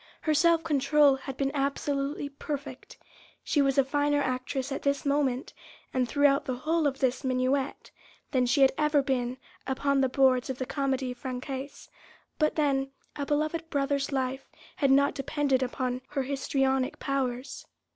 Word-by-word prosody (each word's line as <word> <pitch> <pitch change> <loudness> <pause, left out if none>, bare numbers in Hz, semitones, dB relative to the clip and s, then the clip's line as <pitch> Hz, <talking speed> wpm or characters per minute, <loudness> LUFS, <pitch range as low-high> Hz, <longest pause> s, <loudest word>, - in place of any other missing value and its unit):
Her 310 - +1
self 330 +2 +4
control 295 -1 +4
had 265 0 -7
been 275 -1 0
absolutely 280 0 -1
perfect—she 280 +1 -5
was 275 -1 +1
a 275 - +6
finer 290 +1 +1
actress 260 0 -2
at 275 - -3
this 280 0 0
moment, 280 -3 0 0.4
and 255 -2 0
throughout 285 -1 +3
the 260 -3 -2
whole 310 +4 +1
of 270 -1 -2
this 260 +1 0
minuet, 260 +1 -1 0.4
than 255 -3 +2
she 275 +4 +2
had 270 - +7
ever 300 -2 +3
been 255 -2 -1 0.3
upon 275 +1 +1
the 265 - +2
boards 260 -1 +3
of 260 - -3
the 260 - -3
Comédie 265 -2 -1
Française; 260 +2 -6 0.5
but 305 -1 +2
then, 275 -3 +1 0.3
a 285 -1 -4
beloved 310 +2 -1
brother's 280 -1 0
life 265 0 -2 0.3
had 275 - +2
not 280 +1 +4
depended 275 -1 0
upon 255 0 -2
her 280 -2 -2
histrionic 270 -1 0
powers. 260 -1 -3
275 Hz, 155 wpm, -28 LUFS, 260-285 Hz, 0.5 s, had